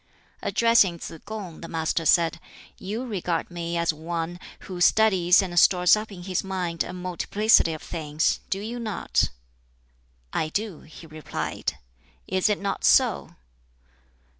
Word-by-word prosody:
Addressing 230 -7 +3
Tsz 165 0 -8
kung, 205 -7 -7
the 165 - -7
Master 160 0 -1
said, 170 -1 +3 0.4
"You 220 +7 -4
regard 180 -7 -2
me 170 0 -3
as 170 -1 +1
one 165 +2 -4 0.2
who 180 -2 -7
studies 190 -3 +5
and 175 -2 +1
stores 180 +1 +6
up 215 0 -5
in 180 -3 -9
his 185 -1 -2
mind 180 -3 -2
a - - -7
multiplicity 185 +2 +2
of 155 - -8
things 155 -1 -1
do 195 - -1
you 230 +4 -5
not?" 215 -4 0 1.0
"I 155 - -1
do," 205 0 -3
he 160 +1 -13
replied; 155 -1 -4 0.5
"is 185 +3 +1
it 210 - 0
not 200 0 -3
so?" - - +3
180 Hz, 140 wpm, -25 LUFS, 165-200 Hz, 1.0 s, stores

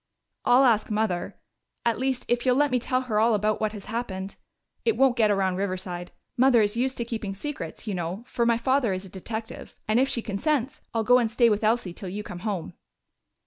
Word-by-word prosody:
"I'll 250 +2 +6
ask 230 -5 +3
Mother 210 -5 -1 0.5
at 230 -2 +1
least, 260 -1 -1
if 240 0 +1
you'll 255 -1 +3
let 290 +1 +3
me 250 - +2
tell 255 +2 0
her 225 -5 0
all 225 0 +4
about 210 +1 0
what 215 -1 +1
has 205 -2 -8
happened. 200 -4 -4 0.5
It 455 - +1
won't 265 -2 +4
get 220 -3 +3
around 190 -2 +1
Riverside 185 -2 -3 0.2
Mother 250 -1 +5
is 205 +1 0
used 260 +2 0
to 235 - -2
keeping 220 -4 -4
secrets, 295 +5 -6
you 210 - -2
know, 180 +4 -4
for 240 - -1
my 235 -1 +3
father 255 -3 +1
is 185 +1 -4
a - - -11
detective. 220 +5 -7
And 215 +3 +3
if 265 +1 +3
she 235 - -1
consents, 260 +5 -1
I'll 225 -1 0
go 245 +3 +6
and 235 -2 +1
stay 235 0 +4
with 210 +1 0
Elsie 215 -4 +1
till 190 +1 -7
you 205 +3 -5
come 175 - -8
home." 185 - -3
225 Hz, 220 wpm, -26 LUFS, 200-245 Hz, 0.5 s, I'll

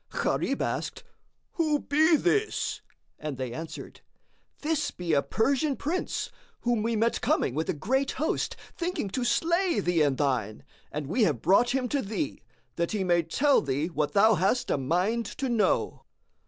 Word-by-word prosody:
Gharib - - -1
asked, - - -3 0.5
"Who 310 -3 +1
be 315 +3 +4
this?" 410 +8 0 0.4
and 150 -3 -5
they 130 -2 -4
answered, 160 +5 -8 0.6
"This 310 0 0
be 175 -3 -3
a 140 - +4
Persian 275 - +1
Prince, 330 +8 -2 0.3
whom 240 -2 +1
we 230 +1 0
met 230 +2 +1
coming 125 - +1
with 160 +4 -2
a - - +2
great 260 - 0
host, 310 +4 -1 0.2
thinking 345 - -2
to 255 - -1
slay 340 +9 +2
thee 175 -2 +1
and 140 -3 +2
thine, 125 -7 -1 0.3
and 150 -1 -4
we 195 - -1
have 145 - -1
brought 240 +9 +4
him 255 -2 0
to 285 - 0
thee, 220 +8 -3 0.4
that 170 +4 -1
he 205 -3 0
may 175 -2 +3
tell 270 - +3
thee 145 +4 -1
what 150 -2 -1
thou 220 +2 +6
hast 195 +6 +1
a - - +2
mind 185 - 0
to 270 -2 -1
know." 230 -3 +1
220 Hz, 170 wpm, -28 LUFS, -, 0.6 s, thou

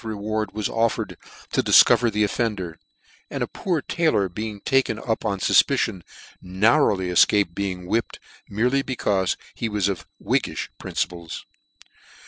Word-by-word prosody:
reward 110 -1 -3
was 105 -1 -2
offered 115 0 -1 0.4
to - - +2
dif - - +7
cover 120 - +3
the 105 0 0
offender: 100 -6 -2 0.5
and - - -3
a - - -2
poor 170 -7 -2
taylor 155 - +1
being 105 +3 -6
taken 130 -4 +1
up 110 0 -3
on 100 -2 -1
fufpicion, 95 0 +2 0.4
narrowly 95 0 +2
efcaped 90 +1 +3
being 95 -1 -4
whipped, 115 +5 -1 0.3
merely 125 +7 +1
becaufe 105 -8 -1 0.2
he 115 - -3
was 105 -3 0
of 100 - -4
whiggifh - - -1
principles. 85 -2 -4
105 Hz, 135 wpm, -23 LUFS, 95-115 Hz, 0.5 s, dif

